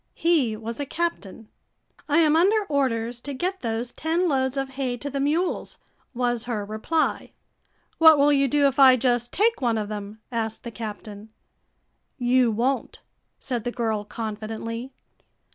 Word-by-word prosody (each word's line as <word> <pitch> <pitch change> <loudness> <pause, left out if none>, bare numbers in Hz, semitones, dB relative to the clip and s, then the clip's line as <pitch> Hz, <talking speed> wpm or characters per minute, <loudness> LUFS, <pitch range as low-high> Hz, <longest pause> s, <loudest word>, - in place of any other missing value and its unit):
He 290 -11 +2
was 230 +3 -6
a 285 - -2
captain. 255 - -4 0.6
"I 295 - +3
am 310 -1 +4
under 405 +6 +4
orders 245 -6 -1
to 280 +1 -6
get 370 +7 -3
those 230 +1 -3
ten 335 +3 0
loads 265 -3 0
of 270 0 -2
hay 260 -2 -3
to 285 +4 -6
the 280 - -2
mules," 315 +6 -1 0.4
was 240 -1 -1
her 220 -4 -3
reply. 220 +10 -1 0.7
"What 320 -1 +8
will 290 +1 +4
you 275 -1 +3
do 285 +2 +2
if 275 0 +1
I 260 -2 +8
just 240 -1 0
take 445 -2 +1
one 235 -3 +1
of 210 -1 -3
them?" 210 0 -7
asked 225 -2 -3
the 235 - -6
captain. 215 -1 -8 0.9
"You 250 -1 +3
won't," 245 +5 -1 0.4
said 245 -4 -3
the 245 - -2
girl 220 -4 -1
confidently. 225 +3 -5
250 Hz, 160 wpm, -24 LUFS, 225-285 Hz, 0.9 s, What